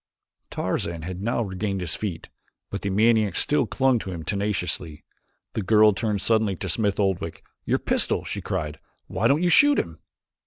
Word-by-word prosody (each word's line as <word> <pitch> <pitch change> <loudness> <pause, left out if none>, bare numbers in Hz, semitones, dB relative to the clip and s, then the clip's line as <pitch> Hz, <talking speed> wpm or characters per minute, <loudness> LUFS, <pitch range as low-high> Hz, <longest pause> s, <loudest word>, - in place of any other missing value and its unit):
Tarzan 85 -1 -3
had 90 +2 -6
now 115 +2 0
regained 95 0 -3
his 90 -3 -2
feet, 95 -7 -5 0.4
but 100 - -4
the 100 - -2
maniac 110 -1 +3
still 150 - +2
clung 130 -3 +2
to 95 - -6
him 85 -3 -6
tenaciously. 90 -5 -3 0.5
The - - -2
girl 105 +2 +5
turned 105 -1 -1
suddenly 110 -3 +1
to - - -5
Smith 105 -3 0
Oldwick. 95 -5 -1 0.2
"Your - - +2
pistol!" - - +1
she - - -4
cried. 75 0 -4 0.3
"Why 105 +4 0
don't 145 +7 +2
you 175 - +3
shoot 290 - +6
him?" 80 -1 -3
100 Hz, 170 wpm, -24 LUFS, 90-110 Hz, 0.5 s, shoot